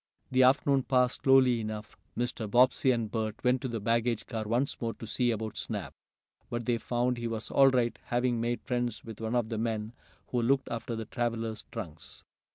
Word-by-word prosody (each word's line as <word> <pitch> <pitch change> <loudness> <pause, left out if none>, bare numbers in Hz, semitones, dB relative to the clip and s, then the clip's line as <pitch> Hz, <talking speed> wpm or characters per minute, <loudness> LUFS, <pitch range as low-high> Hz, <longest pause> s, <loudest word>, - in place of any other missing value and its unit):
The 130 0 +4
afternoon 135 +1 +4
passed 125 -1 +1
slowly 130 -3 +5
enough. 110 -1 -6 0.2
Mr. 120 -3 -2
Bobbsey 125 +3 +4
and 115 -4 +1
Bert 110 -1 -3
went 125 0 +3
to - - -2
the 115 -2 -3
baggage 115 +1 0
car 110 -1 -4
once 120 +6 0
more, 115 -1 -2
to - - -8
see 120 +3 +1
about 110 -1 -3
Snap, - - -4 0.6
but 120 -1 -3
they 120 -1 +1
found 120 +1 0
he 120 - -2
was 115 -1 -4
all 135 -1 +6
right, 120 -5 +1
having 120 -1 0
made 120 +1 -1
friends 120 -3 -2
with 115 -1 -9
one 110 +2 -1
of 120 -3 +1
the 110 -2 -2
men 110 -1 -2 0.4
who 125 - 0
looked 135 +3 +2
after 115 0 -4
the 110 0 -4
travelers' 115 -1 -3
trunks. 80 -9 -8
120 Hz, 195 wpm, -30 LUFS, 110-125 Hz, 0.6 s, all